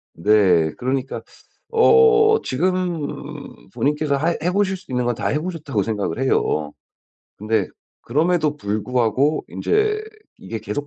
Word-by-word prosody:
네. 90 -4 +3
그러니까 130 - -3 0.5
어 450 -1 +5
지금 170 - -3
본인께서 150 0 0
하 155 +5 +1
해 170 +4 0
보실 195 0 0
수 185 -6 -15
있는 125 -1 0
건 120 - 0
다 - - -3
해 150 - 0
보셨다고 155 - -3
생각을 105 +1 -3
해요. 75 - 0 0.7
근데 105 -2 0 0.3
그럼에도 155 +2 +1
불구하고 125 +6 0
인제 425 0 0 0.4
이게 115 - -6
계속 110 +7 -5
145 Hz, 260 characters per minute, -21 LUFS, 110-180 Hz, 0.7 s, 어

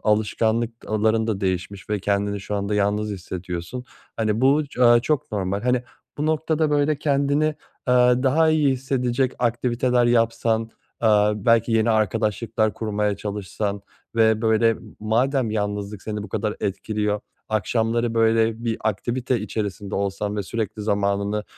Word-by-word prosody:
alışkanlıkların 110 0 +1
da 110 -3 -2
değişmiş 95 +2 -3
ve 105 - +1
kendini 100 +1 0
şu 105 - -5
anda 100 +1 -1
yalnız 105 +1 0
hissediyorsun. 90 +4 -6 0.3
Hani, 110 0 0
bu 145 +3 +3
ç 130 - -13
aaa, 120 -1 +6
çok 150 -1 -1
normal. 100 0 -2
Hani, 125 0 +1 0.4
bu 150 - 0
noktada, 155 0 +1
böyle, 145 0 +2
kendini, 145 0 +1 0.4
eee, 125 0 +4
daha 155 +4 +3
iyi 155 -2 +3
hissedecek 130 -1 0
aktiviteler 120 +1 +1
yapsan, 115 -1 +1 0.3
eee, 110 - +4 0.3
belki 115 +2 +2
yeni 115 +1 +3
arkadaşlıklar 110 0 0
kurmaya 105 -2 -1
çalışsan 100 0 -4 0.3
ve 110 -1 +3
böyle 115 0 +3 0.2
madem 120 +3 +1
yalnızlık 105 -1 -3
seni 105 -1 -4
bu 105 - -8
kadar 105 +2 -2
etkiliyor, 105 +1 -1 0.3
akşamları, 115 +2 0
böyle, 115 0 +2
bir 115 -1 0
aktivite 120 +3 -1
içerisinde 105 -1 -4
olsan 100 +1 -2
ve 105 - -1
sürekli 110 +1 -4
zamanını, 100 0 0
110 Hz, 135 wpm, -23 LUFS, 105-120 Hz, 0.4 s, aaa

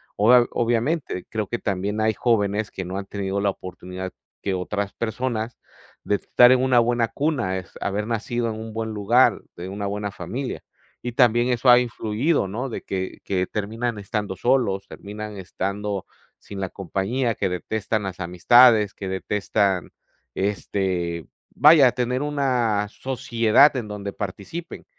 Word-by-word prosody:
Obvia 120 +4 +5
obviamente, 120 - -1
creo 110 -1 -2
que 120 - -3
también 100 +2 -2
hay 110 0 +2
jóvenes 105 -3 +1
que 95 - -5
no 90 +2 -4
han 100 - -4
tenido 100 -1 -3
la 100 0 +1
oportunidad 95 0 -7 0.3
que 95 -2 -1
otras 100 +2 -3
personas, 115 0 -3 0.4
de 105 - +1
estar 125 +4 +5
en 130 -1 +4
una 130 -2 +4
buena 120 0 +2
cuna, 120 -9 -1
es 90 -3 -8
haber 105 +2 -2
nacido 115 +1 -1
en 110 0 -5
un 110 0 -7
buen 110 0 -3
lugar, 110 +5 +3
de 90 +2 -7
una 100 +1 -4
buena 100 +1 -2
familia. 115 +9 -5 0.4
Y 120 - -3
también 120 0 +4
eso 125 +1 +2
ha 120 0 +9
influido, 120 +2 0
¿no?, 120 +8 -4
de 115 - -5
que 95 -1 -4
que 95 -2 0
terminan 110 +2 -3
estando 100 -1 -3
solos, 100 -3 +1
terminan 105 0 -8
estando 100 +1 -3 0.3
sin 100 -1 -9
la 95 - -2
compañía, 105 +6 -2
que 95 - -1
detestan 110 +4 -2
las 95 -2 -5
amistades, 105 +5 +5
que 100 - -6
detestan, 95 0 0 0.4
este, 95 -4 -2 0.3
vaya, 150 -4 +7
tener 125 +3 -1
una 125 -8 +1
sociedad 120 +2 +3
en 115 -4 -4
donde 100 -1 -5
participen. 105 - -6
105 Hz, 155 wpm, -23 LUFS, 100-120 Hz, 0.4 s, ha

